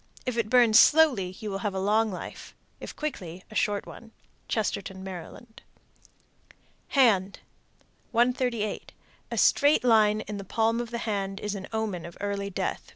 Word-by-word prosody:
If 250 -2 -2
it 230 -2 -1
burns 235 -2 +6
slowly 250 -14 +4
you 215 -2 -5
will 195 - -3
have 200 -1 -3
a - - -1
long 215 +3 +2
life. 180 - -8 0.2
If - - -8
quickly, 185 - -6
a - - -10
short 205 -1 0
one. 225 -1 -12 0.4
Chestertown, 195 -3 -2
Md. 190 +5 -9 1.4
HAND. 200 -7 +4 0.7
138. 240 -3 0 0.4
A - - -4
straight 290 -1 +4
line 215 -3 +4
in 210 - -6
the 200 - -6
palm 225 +4 0
of 240 - -6
the 235 - -4
hand 195 -2 -2
is 210 -1 -3
an 190 -2 -6
omen 215 -7 -3
of 170 - -13
early 200 -1 -3
death. 195 - -4
215 Hz, 155 wpm, -27 LUFS, 195-235 Hz, 1.4 s, burns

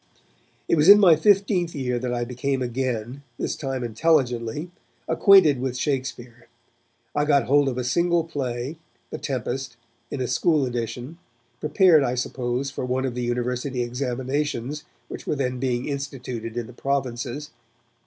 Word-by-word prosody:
It - - +2
was 150 +5 +5
in 205 +1 +10
my 180 -6 +7
fifteenth 190 -1 +2
year 125 -3 -1
that 125 0 -3
I 120 0 -1
became 130 +2 -2
again, 125 0 -3 0.2
this - - -2
time 135 -3 -3
intelligently, 125 +3 0 0.4
acquainted 170 -10 +5
with 130 -1 -2
Shakespeare. 125 -4 -4 0.7
I 145 - +1
got 145 -3 +3
hold 140 +2 +3
of 125 - -4
a 125 - -1
single 170 +6 +2
play, 140 -2 -4 0.3
The - - -5
Tempest, 130 -1 -4 0.3
in 140 - -5
a 125 - -1
school 155 -1 +2
edition, 120 +5 -5 0.4
prepared, 155 +1 +5
I 125 -2 0
suppose, 125 +1 -2
for - - -5
one 130 +1 -1
of 130 - -2
the 125 - -4
university 125 +1 -2
examinations 130 +3 -3 0.2
which - - -9
were - - 0
then 130 -2 -2
being 125 -1 -1
instituted 125 -5 -5
in 120 - -2
the 125 - -12
provinces. 135 +2 -3
130 Hz, 155 wpm, -24 LUFS, 120-150 Hz, 0.7 s, in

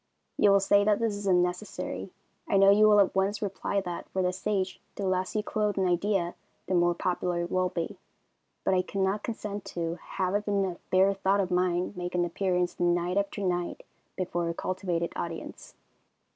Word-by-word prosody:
You 205 - +4
will 200 0 +6
say 200 +1 +4
that 210 0 +3
this 230 -1 0
is 205 0 -5
unnecessary. 180 +2 -1 0.4
I 195 - +3
know 195 0 +7
you 215 +1 +6
will 210 -1 +6
at 200 - +4
once 195 +2 +1
reply 200 0 -2
that, 175 -2 -6
for 190 - -1
the 180 0 +1
stage, 190 -1 -2
the 200 - -3
less 185 +2 -1
you 210 - +1
clothe 210 -1 -1
an 190 -1 +2
idea 180 0 +1 0.3
the - - -2
more 175 -1 +3
popular 175 -1 -1
it 175 - -6
will 185 0 +1
be, 170 -2 -4 0.6
but - - +2
I 185 - +4
could 195 +1 -4
not 195 +2 +1
consent 210 -3 -5
to 170 0 -2
have 185 +1 -2
even 205 -1 +1
a 180 -2 -4
bare 190 +1 +4
thought 195 +1 +1
of 190 -2 0
mine 180 0 +1
make 180 0 -4
an 175 0 +2
appearance 180 0 -1
night 175 +1 +1
after 200 +1 -1
night 175 -2 -2 0.3
before 175 -2 -2
a 170 - -3
cultivated 180 -2 -2
audience. 165 -1 -6
185 Hz, 195 wpm, -28 LUFS, 175-200 Hz, 0.6 s, know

